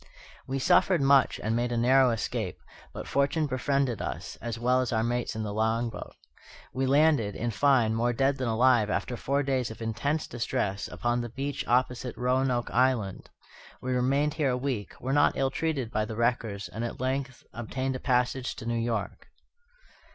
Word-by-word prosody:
We 135 - -2
suffered 175 +6 +3
much 135 -1 +4
and 110 +1 0
made 120 +1 0
a 120 - -1
narrow 130 +2 +5
escape; 115 -2 -3 0.3
but - - -7
fortune 140 +3 +1
befriended 135 -3 0
us, - - -5
as 115 -1 -4
well 125 +2 +2
as 130 - -2
our 110 -2 +1
mates 120 0 -1
in 110 - -3
the 105 -1 -4
long 110 +2 0
boat. - - -9 0.6
We 130 0 0
landed, 140 -7 +3
in 120 0 -2
fine, 120 -2 +3
more 120 +2 +1
dead 135 +3 +1
than 130 -2 -2
alive, 115 -1 +3
after 120 +3 -2
four 140 +4 0
days 130 -3 0
of 110 - -9
intense 120 +8 -1
distress, 120 -4 -2
upon 120 0 -1
the 120 - -5
beach 135 +4 -4
opposite 125 0 0
Roanoke 125 -1 0
Island. 120 -6 0 0.5
We 130 0 -3
remained 135 +4 +1
here 155 -4 0
a 125 - 0
week, 125 -6 -4
were 130 +2 -2
not 145 0 +3
ill 135 -1 +1
treated 140 -7 -2
by 110 - 0
the 110 - -6
wreckers, 115 -4 -1
and 105 +7 -6
at 120 - -5
length 130 0 -3
obtained 130 +3 -3
a - - -4
passage 125 0 0
to - - -9
New 115 0 -1
York. 115 -3 -3
125 Hz, 185 wpm, -28 LUFS, 115-135 Hz, 0.6 s, narrow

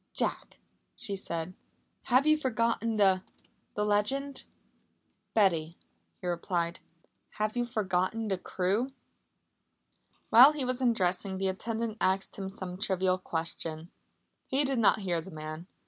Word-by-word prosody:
"Jack," - - -1 0.4
she 200 - -3
said, 170 -2 -4 0.5
"have 255 +3 +4
you 310 0 +6
forgotten 230 -4 0
the 190 -2 +4 0.5
the 210 - 0
legend?" 265 +7 0 0.9
"Betty," 170 -6 +2 0.4
he - - -10
replied, 170 0 -1 0.5
"have 215 +1 -2
you 245 0 +1
forgotten 215 0 -1
the 190 -3 -1
crew?" 195 +9 0 1.4
While 260 +6 +9
he 290 -4 -1
was 255 +1 -1
undressing 190 -5 +1
the 190 0 0
attendant 225 +3 -3
asked 190 +1 +1
him 195 -1 -5
some 185 -1 -7
trivial 185 -2 +1
question. 165 -1 -4 0.6
He 270 +2 +2
did 270 -3 0
not 215 0 +4
hear 175 -4 -1
the 170 - -10
man. 155 +1 -7
195 Hz, 130 wpm, -30 LUFS, 180-230 Hz, 1.4 s, While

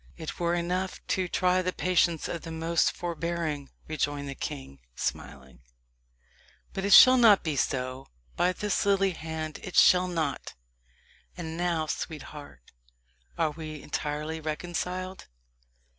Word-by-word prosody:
"It 160 - -7
were 170 0 +1
enough 180 +2 -2
to 185 -2 +1
try 180 +1 +2
the 185 0 -1
patience 175 -3 +1
of 170 - -4
the 165 - -8
most 165 +1 +1
forbearing," 165 -4 -3 0.2
rejoined 145 -2 -2
the 140 - -4
king, 135 - -6 0.2
smiling 65 +1 -5 1.1
"but 195 - -3
it 200 0 +3
shall 255 0 +10
not 225 -5 +6
be 155 -3 -1
so 130 -1 -2 0.3
by 180 - +2
this 205 +2 -1
lily 195 -1 +3
hand 160 -2 -5
it 180 - -8
shall 180 0 +6
not! 160 -5 -3 0.8
And 160 0 -5
now, 170 -2 0
sweetheart, 150 - -7 0.7
are 155 - +1
we 155 -1 -8
entirely 150 +2 -3
reconciled? 180 +4 -4
165 Hz, 130 wpm, -28 LUFS, 150-180 Hz, 1.1 s, shall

